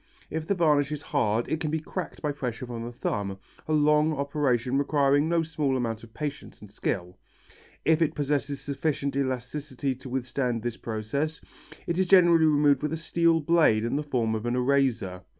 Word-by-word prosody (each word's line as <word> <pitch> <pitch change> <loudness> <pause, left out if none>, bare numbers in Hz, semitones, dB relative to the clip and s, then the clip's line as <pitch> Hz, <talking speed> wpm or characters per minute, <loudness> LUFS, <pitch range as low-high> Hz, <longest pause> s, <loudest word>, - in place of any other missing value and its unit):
If 160 0 -3
the 200 - +1
varnish 150 -4 +3
is 150 -1 -4
hard 115 -5 0
it 160 - -1
can 160 -2 -2
be 160 +1 0
cracked 175 +3 -6
by 150 - +1
pressure 125 -4 -4
from 120 -2 -6
the 120 - -6
thumb, 100 -4 -3 0.3
a - - -3
long 150 +1 +4
operation 140 -3 0
requiring 145 +1 +2
no 170 -1 +2
small 150 -4 -1
amount 115 -3 -3
of 115 - -13
patience 145 +4 -6
and 105 -2 -13
skill. 90 -3 -3 0.7
If 160 0 +3
it 160 - +1
possesses 145 -1 -1
sufficient 140 0 -2
elasticity 135 +1 -2
to 130 +1 -11
withstand 125 -2 -2
this 120 -1 -2
process, 120 +9 -3 0.5
it 170 +1 -1
is 190 - +2
generally 175 -3 +6
removed 145 -3 +4
with 150 +1 -2
a - - -1
steel 165 0 +2
blade 145 -9 +3
in 120 - -1
the 145 - 0
form 125 -7 -1
of 110 +1 -3
an 120 - 0
eraser. 125 -8 +1
140 Hz, 185 wpm, -27 LUFS, 120-155 Hz, 0.7 s, generally